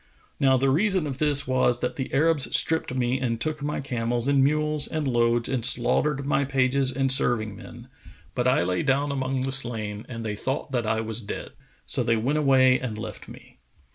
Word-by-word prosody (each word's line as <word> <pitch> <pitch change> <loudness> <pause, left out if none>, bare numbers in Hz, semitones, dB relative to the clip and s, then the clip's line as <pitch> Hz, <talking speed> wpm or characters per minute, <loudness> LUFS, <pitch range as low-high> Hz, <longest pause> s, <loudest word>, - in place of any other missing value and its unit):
Now 135 -1 +4
the 135 +1 +1
reason 185 +2 +2
of 135 -2 -5
this 145 -2 +3
was 130 -2 +1
that 125 0 -2
the 130 - -5
Arabs 150 0 +2
stripped 160 -4 +1
me 125 0 0
and 115 -3 -2
took 150 +4 -3
my 145 0 -3
camels 120 -2 -2
and 140 -1 +3
mules 150 +1 0
and 155 -3 -3
loads 120 -1 +1
and 130 -3 -2
slaughtered 135 +3 +1
my 140 0 +1
pages 135 0 +1
and 135 0 +1
serving 115 -6 +1
men; 120 +4 -12 0.5
but 125 0 -1
I 125 -9 +3
lay 90 +1 -1
down 140 +1 0
among 135 -1 -2
the 135 +1 -2
slain 115 -5 -2
and 115 -2 -6
they 105 -1 -3
thought 135 +6 -4
that 120 -4 -1
I 110 0 0
was 110 +1 -4
dead, 100 - -7 0.3
so - - 0
they 115 -1 +1
went 135 +7 0
away 130 -3 +4
and 115 -4 -5
left 110 - -8
me. - - -15
130 Hz, 200 wpm, -25 LUFS, 120-140 Hz, 0.5 s, Now